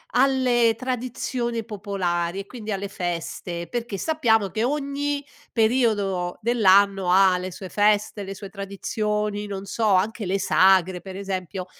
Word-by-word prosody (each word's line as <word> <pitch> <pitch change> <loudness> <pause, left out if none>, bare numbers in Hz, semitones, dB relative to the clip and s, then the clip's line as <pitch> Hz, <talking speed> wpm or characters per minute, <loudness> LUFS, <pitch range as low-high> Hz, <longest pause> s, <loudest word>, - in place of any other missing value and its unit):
alle 250 -3 +3
tradizioni 245 -2 -3
popolari 190 -4 -2
e - - -11
quindi 220 0 -7
alle 195 0 -4
feste, 175 -2 -4
perché 235 -4 -3
sappiamo 225 - +2
che 220 +4 -2
ogni 285 +1 -2 0.3
periodo 215 -6 +1
dell'anno 200 -4 +4
ha 190 0 +5
le 185 +1 -5
sue 190 +1 -8
feste, 210 0 +1
le 195 0 -6
sue 200 0 -9
tradizioni, 210 +1 -3
non 195 -1 -5
so, 220 +3 -2
anche 210 +3 +1
le 190 +2 0
sagre, 190 -2 +4
per 190 +2 -9
esempio, 190 -1 -4
205 Hz, 135 wpm, -24 LUFS, 190-235 Hz, 0.3 s, ha